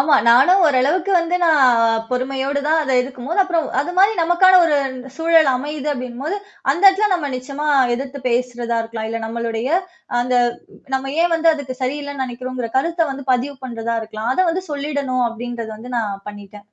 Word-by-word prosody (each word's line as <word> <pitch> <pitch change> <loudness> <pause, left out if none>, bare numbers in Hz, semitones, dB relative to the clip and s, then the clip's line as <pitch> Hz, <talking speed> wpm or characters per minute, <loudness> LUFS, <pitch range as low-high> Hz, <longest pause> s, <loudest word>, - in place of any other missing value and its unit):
ஆமா. 285 +1 +4
நானும் 315 +11 +5
ஓரளவுக்கு 305 +8 +1
வந்து 335 +1 -1
நான் 240 -8 +4
பொறுமையோடு 265 +2 -1
தான் 315 +1 +3
அத 270 -3 -2
எதிர்க்கும்போது 265 +8 -3
அப்புறம் 335 -5 -1
அது 295 +6 -3
மாரி 400 +3 +5
நமக்கான 365 +2 +5
ஒரு 300 -3 +2 0.4
சூழல் 325 -2 +4
அமையுது 295 +2 -5
அப்டினும்போது, 255 +7 -4 0.3
அந்த 340 +7 -2
இடத்துல 395 +2 +4
நம்ம 305 -5 -2
நிச்சயமா 275 +4 -5 0.3
எதிர்த்து 270 +2 -6
பேசுறதா 240 -1 -1
இருக்கலாம். 225 -1 -6
இல்ல 230 0 -3
நம்மளுடைய 230 +1 -3 0.5
அந்த, 250 +1 -1 0.6
நம்ம 270 +1 -2
ஏன் 345 0 +1
வந்து 330 0 +4
அதுக்கு 260 -4 -7
சரியில்லன்னு 285 +1 -3
நினைக்கிறோங்கிற 250 0 -5
கருத்த 330 +3 +1
வந்து 275 0 -6
பதிவு 265 +3 -1
பண்றதா 230 -2 -3
இருக்கலாம். 220 +1 -4
அத - - -8
வந்து 370 +3 -3
சொல்லிடணும் 280 -4 -1
அப்டின்றத 230 -1 -6
வந்து 245 +3 -10
நான் 200 -3 -4
பண்ணிட்டேன். 205 0 -12
265 Hz, 160 wpm, -19 LUFS, 240-310 Hz, 0.6 s, நானும்